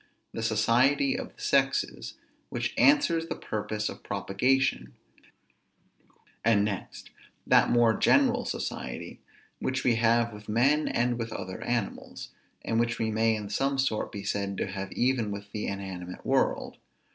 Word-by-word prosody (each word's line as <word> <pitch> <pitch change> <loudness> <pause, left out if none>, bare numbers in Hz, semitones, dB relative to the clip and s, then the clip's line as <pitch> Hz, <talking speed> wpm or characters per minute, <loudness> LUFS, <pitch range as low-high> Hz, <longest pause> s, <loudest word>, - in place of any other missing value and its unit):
The - - -4
society 120 - +3
of 250 -1 -6
the 415 - -15
sexes, 420 - 0 0.3
which - - -2
answers 280 - +4
the - - -3
purpose 105 0 -3
of - - -7
propagation; 130 +7 0 1.5
and 105 -2 +4
next, 100 -3 -6 0.3
that - - +5
more 120 -2 +4
general - - +3
society, - - -5 0.4
which 130 0 -2
we 120 -3 +3
have 115 0 +2
with 105 +1 -11
men 135 +8 +3
and 120 0 0
with 115 -1 -4
other 95 -3 -6
animals, 120 -5 -3 0.4
and 115 - +1
which 115 0 0
we 110 -1 -1
may 110 +1 +2
in 105 -2 -5
some 135 +5 0
sort 135 -5 0
be 100 -3 -6
said 100 -1 -2
to - - -1
have 95 0 -5
even 125 -3 +1
with 100 0 -7
the 105 0 -3
inanimate 95 -2 -6
world. - - 0
115 Hz, 145 wpm, -28 LUFS, 105-130 Hz, 1.5 s, that